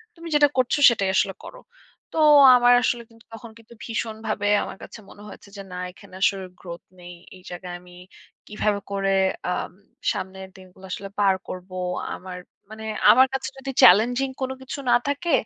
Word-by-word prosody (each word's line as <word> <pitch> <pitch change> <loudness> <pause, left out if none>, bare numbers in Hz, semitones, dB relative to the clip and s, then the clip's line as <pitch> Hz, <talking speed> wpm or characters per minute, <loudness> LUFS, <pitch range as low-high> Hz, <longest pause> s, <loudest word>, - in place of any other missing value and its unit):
তুমি 335 0 -11
যেটা 295 0 +6
করছো 255 +3 +1
সেটাই 200 -5 -1
আসলে 195 0 +1
করো।" - - -11 0.6
তো - - 0 0.4
আমার 245 0 +5
আসলে 240 -1 -1
কিন্তু 230 0 -22
তখন 225 0 -10
কিন্তু 230 +1 -17
ভীষণ 225 -1 -4
ভাবে 205 -1 -2 0.2
আমার - - -8
কাছে - - -11
মনে 205 - -14
হয়েছে 200 0 -13
যে - - -7
না - - -7 0.2
এখানে 185 - -18
আসলে 195 -2 +1
গ্রোথ 170 -1 -9 0.2
নেই 175 0 -11 0.2
এই - - -18
জায়গায় 175 0 -8
আমি 180 0 -17 0.5
কীভাবে 210 -1 -1
করে 195 0 -1 0.4
আম - - -3 0.4
সামনের 190 0 -7
দিনগুলো 185 0 -16
আসলে 195 +1 -6
পার 195 -2 +3
করবো। 185 0 -9 0.4
আমার 180 -1 -9 0.3
মানে 220 0 -9 0.3
আমার 260 +2 +5
কাছে 270 - -3
যদি 270 0 -6
চ্যালেঞ্জিং 245 +8 +5
কোনো 260 0 -2
কিছু 265 +2 -7
না - - +5
থাকে 305 +4 -2
205 Hz, 175 wpm, -23 LUFS, 190-245 Hz, 0.6 s, যেটা